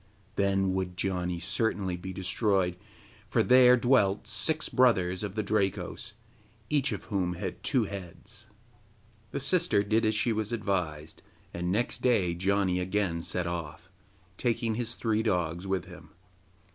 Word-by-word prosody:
Then 95 -1 +1
would 95 -1 -3
Janni 90 -2 -1
certainly 95 0 -1
be 95 +2 -7
destroyed, 95 -1 0 0.5
for 115 +1 +2
there 125 0 +7
dwelt 110 -6 +3
six 115 +9 +1
brothers 95 -8 +3
of 105 -1 -4
the 110 - -1
Drakos, 100 0 -2 0.6
each 145 -2 +2
of - - -4
whom 95 -4 -1
had 95 +2 -5
two 130 -5 +2
heads. 100 +3 -8 0.8
The - - -3
sister 170 - +2
did 110 +3 +1
as 110 0 +2
she 115 +2 +1
was 110 0 -2
advised, 90 -9 -2 0.3
and 90 +1 -2
next 115 +5 -1
day 100 -9 +2
Janni 95 0 +1
again 90 -2 -1
set 90 +1 -2
off, 85 0 -5 0.5
taking 115 -2 0
his 120 +1 -3
three 110 -2 0
dogs 90 -4 -1
with 95 -2 -1
him. - - -13
100 Hz, 145 wpm, -29 LUFS, 90-110 Hz, 0.8 s, there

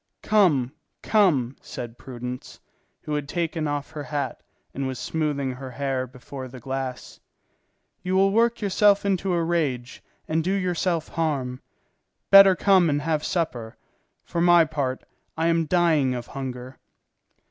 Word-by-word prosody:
"Come, 165 - +3 0.3
come," 150 - +2
said 120 -1 -8
Prudence, 125 -1 -7 0.4
who 150 - -4
had 145 -1 -3
taken 165 -2 -2
off 145 0 -3
her 155 -2 -6
hat 140 -2 -4 0.3
and 135 0 -3
was 130 -1 -4
smoothing 145 -4 -2
her 130 +1 -8
hair 130 0 -2
before 130 +1 -9
the 130 0 -11
glass, 130 0 -5 0.8
"you 185 +1 -1
will 195 +1 +4
work 230 +2 +2
yourself 200 0 +3
into 195 -1 0
a 170 -1 +1
rage 145 -8 -2 0.3
and 160 +1 0
do 185 +3 0
yourself 180 -3 -1
harm. 135 -6 -2 0.7
Better 195 -1 +9
come 185 -3 +4
and 145 0 0
have 155 -1 0
supper; 125 -10 -3 0.5
for 170 - -3
my 175 -1 +6
part, 140 -4 -3 0.3
I 165 +1 +2
am 165 -1 +1
dying 155 -6 +2
of 120 -1 -5
hunger." 130 -1 -7
150 Hz, 145 wpm, -24 LUFS, 130-175 Hz, 0.8 s, Better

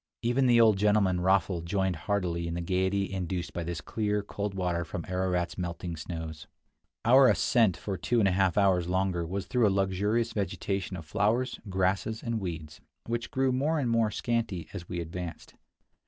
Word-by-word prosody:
Even 125 +3 +2
the 120 -1 +5
old 110 -3 +6
gentleman, 100 -3 +3
Raffl, 95 -1 +2
joined 95 +1 0
heartily 85 -1 -1
in 85 - -3
the 85 - -2
gaiety 95 +2 0
induced 90 -1 -3
by 85 - -3
this 85 -2 -4
clear, 105 +3 -1
cold 100 -1 -4
water 90 -2 -1
from 85 0 -6
Ararat's 90 -1 -1
melting 85 -1 -4
snows. 80 -1 -6 0.6
Our 130 +3 +7
ascent 110 -8 +3
for 90 +1 -4
two 120 - 0
and 105 -4 +4
a - - +3
half 95 0 +2
hours 95 -4 +3
longer 90 -2 0
was 95 +3 -3
through 120 -3 +2
a - - +4
luxuriant 100 +4 0
vegetation 95 -1 -2
of 80 - -9
flowers, 110 +8 0
grasses, 95 +4 0
and 115 -2 -1
weeds, 80 -5 -6 0.2
which 115 0 -3
grew 130 0 +1
more 145 +6 +1
and 125 -6 0
more 115 -2 +3
scanty 110 -7 -2
as 90 -4 -7
we 90 - -3
advanced. 85 0 -6
95 Hz, 180 wpm, -29 LUFS, 85-110 Hz, 0.6 s, Our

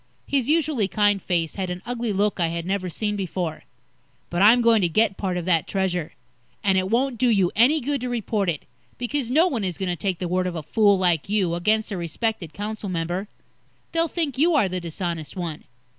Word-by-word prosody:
His 275 -2 0
usually 305 -9 +2
kind 205 +1 +2
face 170 -3 -1
had 190 -2 -3
an 180 0 -5
ugly 240 -2 -2
look 205 0 0
I 170 - +3
had 170 0 -4
never 190 -1 -2
seen 210 +5 -2
before. 180 -4 -4 0.7
"But 175 +1 0
I'm 225 +4 +7
going 230 -2 +5
to 175 - +2
get 210 +3 +2
part 185 -3 -2
of 175 - -3
that 170 -4 +2
Treasure. 180 -4 -1 0.5
And 195 -2 +3
it 185 0 +1
won't 245 +1 0
do 250 - +3
you 195 -6 +3
any 260 +8 +5
good 280 +1 -1
to 250 - -3
report 215 -5 -1
it, 155 -4 -3 0.3
because 250 0 -2
no 310 +7 +4
one 245 - -2
is 180 -3 -2
going 190 -2 -2
to 175 - 0
take 180 +2 -2
the 180 - -3
word 185 +1 0
of 180 - -4
a 160 - -4
fool 205 +5 +3
like 175 -2 +2
you, 195 -5 +1
against 215 +6 +1
a 195 - -2
respected 175 +1 -2
council 210 +2 -5
member. 175 +3 -2 0.6
They'll 330 0 +2
think 300 -5 -2
you 330 +2 +4
are 255 -9 +4
the 185 0 -3
dishonest 170 -1 -4
one. 170 -5 -5
195 Hz, 220 wpm, -24 LUFS, 175-230 Hz, 0.7 s, I'm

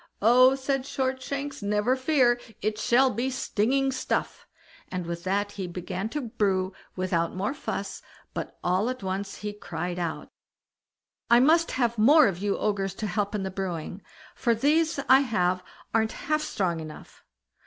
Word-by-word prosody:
"Oh", 255 +4 +6
said 270 0 -1
Shortshanks, 270 +1 -3
"never 210 +5 +1
fear, 260 -3 +3 0.2
it 215 +1 -2
shall 255 +4 +4
be 250 +3 -1
stinging 265 +2 0
stuff"; 260 - -2 0.4
and 180 -2 -4
with 170 0 -5
that 200 +2 0
he 195 -3 -5
began 180 +3 -4
to 295 +5 -3
brew 200 -6 0 0.2
without 180 -3 -1
more 205 +7 -1
fuss, - - -5 0.3
but - - -5
all 185 +6 +1
at 255 -5 -5
once 195 +1 -3
he 210 0 -5
cried 175 -3 -5
out: 170 -2 -4 1.0
"I 235 - +7
must 325 +6 +4
have 235 -3 0
more 295 +7 +7
of 185 -3 -2
you 200 0 0
Ogres 195 -2 -1
to 215 - -4
help 205 +1 -1
in 200 - -2
the 190 - -3
brewing, 185 -1 -4 0.3
for 235 -1 +1
these 310 +6 +2
I 260 +1 +8
have 185 -8 0 0.3
got 225 - +4
a'nt 220 - -1
half 305 +1 -1
strong 185 - -1
enough." 155 -1 -10
215 Hz, 165 wpm, -27 LUFS, 185-260 Hz, 1.0 s, I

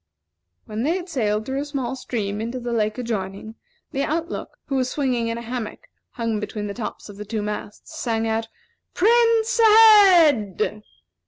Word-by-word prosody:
When 215 +1 -5
they 310 +7 +1
had 365 -1 -5
sailed 215 -8 -1
through 265 +2 -2
a - - -4
small 265 -4 -3
stream 210 -5 -4
into 235 +3 -4
the 240 -1 -4
lake 215 -1 0
adjoining, 220 -3 -4 0.4
the 275 - -2
out 325 +4 -1
look, - - -7
who 275 - -2
was 255 -1 0
swinging 255 -5 -1
in 230 0 -2
a 235 - -7
hammock 245 - -6 0.2
hung 230 -3 -2
between 210 0 -5
the 200 - -4
tops 225 0 -6
of 205 -2 -11
the 210 - -6
two 210 0 -4
masts, 210 +9 -7
sang 225 -2 -1
out, 225 0 -1 0.5
"Prince 460 +2 +3
ahead!" 360 - +6
240 Hz, 175 wpm, -22 LUFS, 215-310 Hz, 0.5 s, ahead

